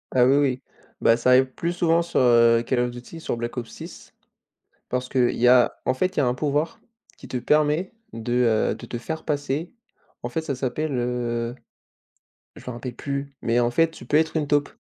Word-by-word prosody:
Ah 125 Hz, -, +6 dB
oui, 135 Hz, +3 st, +4 dB
oui, 130 Hz, -3 st, +1 dB, 0.4 s
bah, 115 Hz, 0 st, +5 dB
ça 125 Hz, +1 st, +1 dB
arrive 130 Hz, +1 st, +6 dB
plus 170 Hz, +1 st, -2 dB
souvent 170 Hz, -1 st, +2 dB
sur, 170 Hz, -, -1 dB
heu, 115 Hz, -2 st, +5 dB
Call 125 Hz, -, +1 dB
of 125 Hz, 0 st, +1 dB
Duty, 120 Hz, +7 st, -10 dB
sur 120 Hz, -, -3 dB
Black 120 Hz, +2 st, -5 dB
Ops 120 Hz, -2 st, -4 dB
6, -, -, -11 dB, 0.8 s
parce 125 Hz, 0 st, -2 dB
qu'il 125 Hz, -2 st, +2 dB
y 125 Hz, -, +2 dB
a, 125 Hz, -1 st, +4 dB
en 130 Hz, -, +1 dB
fait, 185 Hz, +5 st, -1 dB
il -, -, +4 dB
y -, -, +4 dB
a 125 Hz, -, +2 dB
un 125 Hz, -, 0 dB
pouvoir 150 Hz, +3 st, -1 dB, 0.4 s
qui -, -, -12 dB
te 125 Hz, -, -3 dB
permet 150 Hz, +7 st, +1 dB, 0.2 s
de, 115 Hz, +1 st, -4 dB, 0.4 s
heu, -, -, -7 dB
de -, -, -10 dB
te 120 Hz, -, -5 dB
faire 160 Hz, +6 st, -5 dB
passer, 150 Hz, -, -2 dB, 0.5 s
en 120 Hz, -, -4 dB
fait 160 Hz, -, -2 dB
ça 145 Hz, -3 st, -3 dB
s'appelle, 135 Hz, +4 st, -2 dB
heu, 120 Hz, -1 st, -2 dB, 1.0 s
je -, -, -12 dB
me 125 Hz, -, -4 dB
rappelle 120 Hz, +1 st, -6 dB
plus, 140 Hz, +2 st, -5 dB
mais 115 Hz, +1 st, +2 dB
en 120 Hz, 0 st, +2 dB
fait, 165 Hz, +6 st, +2 dB
tu -, -, -13 dB
peux 150 Hz, -, +2 dB
être 160 Hz, +1 st, +2 dB
une 150 Hz, -, -1 dB
taupe 145 Hz, -1 st, +1 dB
130 Hz, 220 wpm, -24 LUFS, 120-150 Hz, 1.0 s, Ah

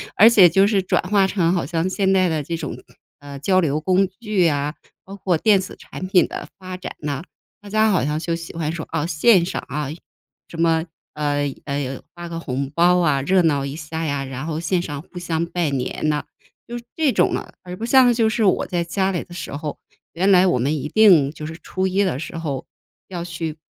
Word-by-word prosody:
而 220 Hz, +3 st, +8 dB
且 200 Hz, -6 st, +7 dB
就 195 Hz, +4 st, +4 dB
是 200 Hz, -2 st, +2 dB
转 185 Hz, -, +1 dB
化 200 Hz, -2 st, +4 dB
成 180 Hz, -4 st, +1 dB
好 175 Hz, -6 st, 0 dB
像 165 Hz, +4 st, -1 dB
现 195 Hz, 0 st, +1 dB
在 185 Hz, -2 st, +3 dB
的 155 Hz, -2 st, -1 dB
这 165 Hz, +3 st, -3 dB
种 160 Hz, -2 st, -5 dB, 0.4 s
呃， 140 Hz, -1 st, -9 dB
交 185 Hz, +6 st, +2 dB
流 155 Hz, -3 st, 0 dB
工 185 Hz, +3 st, +2 dB
具 210 Hz, -5 st, +1 dB
呀， 145 Hz, -1 st, 0 dB, 0.3 s
包 195 Hz, -, -11 dB
括 180 Hz, -4 st, +1 dB
电 205 Hz, +2 st, +4 dB
子 185 Hz, -, -6 dB
产 185 Hz, -, -8 dB
品 185 Hz, -2 st, +4 dB
的 -, -, -6 dB
发 185 Hz, -1 st, -7 dB
展 185 Hz, -, -7 dB
呢， 145 Hz, -1 st, -3 dB, 0.4 s
大 205 Hz, -, -11 dB
家 215 Hz, +1 st, +3 dB
好 180 Hz, -8 st, +2 dB
像 150 Hz, +1 st, -1 dB
就 170 Hz, +1 st, -2 dB
喜 165 Hz, 0 st, -6 dB
欢 160 Hz, -2 st, -2 dB
说 160 Hz, -1 st, -5 dB
啊 160 Hz, -1 st, -1 dB
线 175 Hz, +3 st, +4 dB
上 -, -, -3 dB
啊， 150 Hz, -1 st, -3 dB, 0.6 s
什 170 Hz, -, -10 dB
么， 165 Hz, 0 st, +2 dB, 0.3 s
呃， 145 Hz, -2 st, -1 dB
呃， 140 Hz, -2 st, -3 dB
发 175 Hz, 0 st, -7 dB
个 165 Hz, -, -5 dB
红 135 Hz, -3 st, -3 dB
包 180 Hz, +1 st, +4 dB
啊， 150 Hz, -5 st, +2 dB
热 185 Hz, +7 st, +3 dB
闹 145 Hz, -5 st, +1 dB
一 140 Hz, +1 st, -5 dB
下 160 Hz, +1 st, -5 dB
呀， 140 Hz, -2 st, -1 dB
然 135 Hz, +3 st, -6 dB
后 155 Hz, -2 st, -3 dB
线 175 Hz, +1 st, 0 dB
上 145 Hz, -5 st, -5 dB
互 175 Hz, +2 st, -10 dB
相 170 Hz, -1 st, -1 dB
拜 170 Hz, -2 st, -1 dB
年 135 Hz, +2 st, -2 dB
呐， 150 Hz, -1 st, 0 dB, 0.4 s
就 240 Hz, 0 st, -6 dB, 0.2 s
这 310 Hz, -4 st, +2 dB
种 -, -, +2 dB
啊。 -, -, -6 dB
而 180 Hz, 0 st, -7 dB
不 225 Hz, +5 st, -5 dB
像 250 Hz, 0 st, +6 dB
就 225 Hz, -2 st, +2 dB
是 220 Hz, 0 st, +1 dB
我 190 Hz, -, +2 dB
在 175 Hz, -2 st, -2 dB
家 190 Hz, +2 st, 0 dB
里 175 Hz, -, -2 dB
的 175 Hz, -, -13 dB
时 175 Hz, -, -6 dB
候， 150 Hz, +1 st, -5 dB, 0.4 s
原 190 Hz, +4 st, +2 dB
来 185 Hz, 0 st, +6 dB
我 175 Hz, -, +2 dB
们 135 Hz, +5 st, 0 dB
一 150 Hz, -, -4 dB
定 180 Hz, -9 st, +5 dB
就 155 Hz, -1 st, -8 dB
是 160 Hz, +1 st, -7 dB
初 190 Hz, 0 st, -2 dB
1 195 Hz, +2 st, +1 dB
的 145 Hz, -8 st, -1 dB
时 165 Hz, +2 st, -6 dB
候， 140 Hz, -5 st, -4 dB, 0.4 s
要 175 Hz, -2 st, -5 dB
去 165 Hz, -2 st, -5 dB
170 Hz, 240 characters per minute, -21 LUFS, 150-190 Hz, 0.6 s, 而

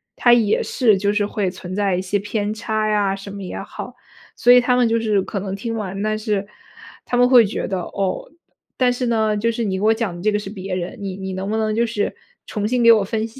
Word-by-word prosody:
它 240 Hz, -, +5 dB
也 225 Hz, -4 st, +3 dB
是 225 Hz, -6 st, +2 dB
就 200 Hz, +1 st, 0 dB
是 210 Hz, 0 st, +1 dB
会 200 Hz, -3 st, -1 dB
存 185 Hz, 0 st, -8 dB
在 200 Hz, -2 st, +1 dB
一 180 Hz, -, -1 dB
些 190 Hz, +2 st, -1 dB
偏 205 Hz, +1 st, -2 dB
差 215 Hz, 0 st, -1 dB
呀， 205 Hz, -2 st, +1 dB
什 195 Hz, +1 st, -9 dB
么 200 Hz, 0 st, -7 dB
也 180 Hz, -, -5 dB
好。 -, -, -8 dB, 0.4 s
所 245 Hz, -, +4 dB
以 250 Hz, -, +9 dB
他 245 Hz, 0 st, +2 dB
们 245 Hz, -2 st, +3 dB
就 230 Hz, 0 st, +2 dB
是 215 Hz, -3 st, +1 dB
可 195 Hz, +1 st, -4 dB
能 195 Hz, 0 st, -4 dB
听 230 Hz, +3 st, -4 dB
完， 195 Hz, -3 st, -4 dB
但 215 Hz, +1 st, 0 dB
是， 210 Hz, -2 st, -2 dB, 0.6 s
他 -, -, -2 dB
们 245 Hz, 0 st, +4 dB
会 245 Hz, -3 st, +7 dB
觉 200 Hz, -, -3 dB
得， 190 Hz, -2 st, -2 dB
哦， 190 Hz, +1 st, -3 dB, 0.5 s
但 250 Hz, -1 st, +3 dB
是 245 Hz, +1 st, -2 dB
呢， 220 Hz, -2 st, +1 dB
就 230 Hz, +3 st, +1 dB
是 230 Hz, +1 st, -3 dB
你 190 Hz, -3 st, -1 dB
给 -, -, -5 dB
我 220 Hz, -, +5 dB
讲 220 Hz, -6 st, -3 dB
的 175 Hz, -, -8 dB
这 215 Hz, -, +3 dB
个 210 Hz, -, 0 dB
是 205 Hz, -, -7 dB
别 195 Hz, -2 st, -6 dB
人， 180 Hz, 0 st, -5 dB
你 195 Hz, -2 st, -5 dB
你 190 Hz, 0 st, -5 dB
能 190 Hz, +1 st, -4 dB
不 220 Hz, -, 0 dB
能 215 Hz, -1 st, 0 dB
就 235 Hz, +2 st, +1 dB
是 215 Hz, -2 st, -2 dB, 0.3 s
重 210 Hz, -1 st, -3 dB
新 245 Hz, +1 st, +1 dB
给 230 Hz, -, +8 dB
我 220 Hz, -3 st, +5 dB
分 220 Hz, +2 st, -2 dB
析 230 Hz, +4 st, -15 dB
210 Hz, 280 characters per minute, -21 LUFS, 195-230 Hz, 0.6 s, 以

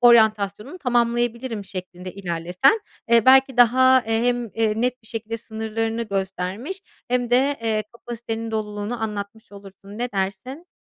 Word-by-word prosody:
oryantasyonumu 220 Hz, -, +4 dB
tamamlayabilirim." 240 Hz, -, 0 dB
şeklinde 185 Hz, -1 st, -8 dB
ilerlesen. 180 Hz, -, +1 dB, 0.3 s
Eee, 230 Hz, -1 st, +5 dB
belki 265 Hz, 0 st, +6 dB
daha, 260 Hz, +2 st, +6 dB
eee, 225 Hz, +1 st, +1 dB
hem, 245 Hz, 0 st, +1 dB
eee, 220 Hz, -1 st, +1 dB
net 250 Hz, 0 st, -1 dB
bir -, -, -17 dB
şekilde 225 Hz, 0 st, -4 dB
sınırlarını 225 Hz, 0 st, -3 dB
göstermiş 200 Hz, -, -4 dB, 0.3 s
hem 245 Hz, -1 st, 0 dB
de, 270 Hz, +3 st, +3 dB
eee, 220 Hz, -1 st, 0 dB
kapasitenin 230 Hz, -1 st, -6 dB
doluluğunu 215 Hz, +1 st, -3 dB
anlatmış 210 Hz, +1 st, -5 dB
olursun. 200 Hz, +1 st, -12 dB
Ne 245 Hz, -1 st, -3 dB
dersin? 200 Hz, -, -4 dB
225 Hz, 135 wpm, -23 LUFS, 205-245 Hz, 0.3 s, belki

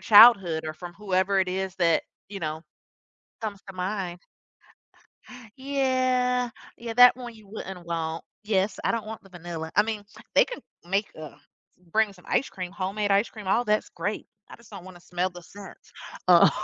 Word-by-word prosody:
childhood 195 Hz, -6 st, +7 dB
or 155 Hz, -, -3 dB
from 175 Hz, +2 st, -9 dB
whoever 195 Hz, 0 st, +1 dB
it 185 Hz, -, +1 dB
is 190 Hz, 0 st, -2 dB
that, 170 Hz, -3 st, +3 dB, 0.3 s
you 200 Hz, -1 st, -7 dB
know, 155 Hz, 0 st, -3 dB, 0.8 s
comes 205 Hz, -3 st, -4 dB
to 195 Hz, -, -8 dB
mind. 180 Hz, -1 st, -3 dB, 1.4 s
Yeah, 255 Hz, -2 st, +1 dB, 0.3 s
yeah, 230 Hz, -1 st, -5 dB
that 245 Hz, +1 st, +8 dB
one 245 Hz, -2 st, -8 dB
you 215 Hz, -2 st, -16 dB
wouldn't 190 Hz, -4 st, -7 dB
want. 165 Hz, -1 st, -3 dB, 0.2 s
Yes, 205 Hz, -1 st, +1 dB
I -, -, +2 dB
don't 230 Hz, -2 st, -2 dB
want 220 Hz, 0 st, -7 dB
the 195 Hz, -, -18 dB
vanilla. 170 Hz, -2 st, -6 dB
I 205 Hz, -, +7 dB
mean, 215 Hz, -1 st, -3 dB, 0.3 s
they -, -, +7 dB
can -, -, -7 dB, 0.3 s
make, 195 Hz, +3 st, +1 dB
uh, 155 Hz, -2 st, -9 dB, 0.6 s
bring 220 Hz, -2 st, +3 dB
some 180 Hz, -2 st, -19 dB
ice 270 Hz, -, +1 dB
cream, 180 Hz, -1 st, -6 dB
homemade 200 Hz, +2 st, -2 dB
ice 200 Hz, +3 st, +4 dB
cream, 215 Hz, -3 st, -10 dB
all 235 Hz, +6 st, +2 dB
that's 215 Hz, -1 st, +1 dB
great. 210 Hz, +1 st, -3 dB, 0.2 s
I -, -, -10 dB
just 235 Hz, -2 st, -19 dB
don't 175 Hz, -, -9 dB
wanna 185 Hz, -1 st, -12 dB
smell 180 Hz, +1 st, -2 dB
the 175 Hz, 0 st, -11 dB
scent. 195 Hz, +3 st, -12 dB, 0.5 s
Oh. -, -, +8 dB
195 Hz, 175 wpm, -26 LUFS, 180-220 Hz, 1.4 s, that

